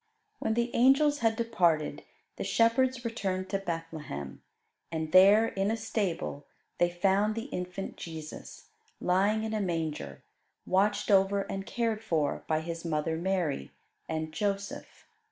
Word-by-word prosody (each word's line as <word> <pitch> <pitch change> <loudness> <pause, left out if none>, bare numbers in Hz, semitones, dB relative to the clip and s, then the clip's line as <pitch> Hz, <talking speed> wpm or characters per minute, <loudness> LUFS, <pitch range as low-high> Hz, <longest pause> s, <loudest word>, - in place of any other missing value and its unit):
When 220 - 0
the 235 +1 0
angels 285 +4 +4
had 225 -1 +2
departed, 180 -10 +1 0.3
the - - -3
shepherds 240 +2 +2
returned 190 -5 -2
to 195 - 0
Bethlehem; 165 - -5 0.5
and 160 -1 -3
there, 200 +5 +7
in 195 +1 -1
a 225 - 0
stable, 200 -9 -3 0.3
they 175 - +4
found 195 +4 +2
the 225 - -3
infant 180 +2 -5
Jesus, 160 -2 -9 0.3
lying 200 +4 +2
in 220 0 -3
a 215 - 0
manger, 160 - -3 0.4
watched 205 +3 +2
over 195 0 +4
and 195 0 -5
cared 230 -4 -1
for 150 -4 0
by 155 0 +1
His 165 0 -5
mother 160 -1 -1
Mary 170 - -1 0.4
and 155 -1 -2
Joseph. 200 +1 -3
195 Hz, 135 wpm, -30 LUFS, 165-220 Hz, 0.5 s, there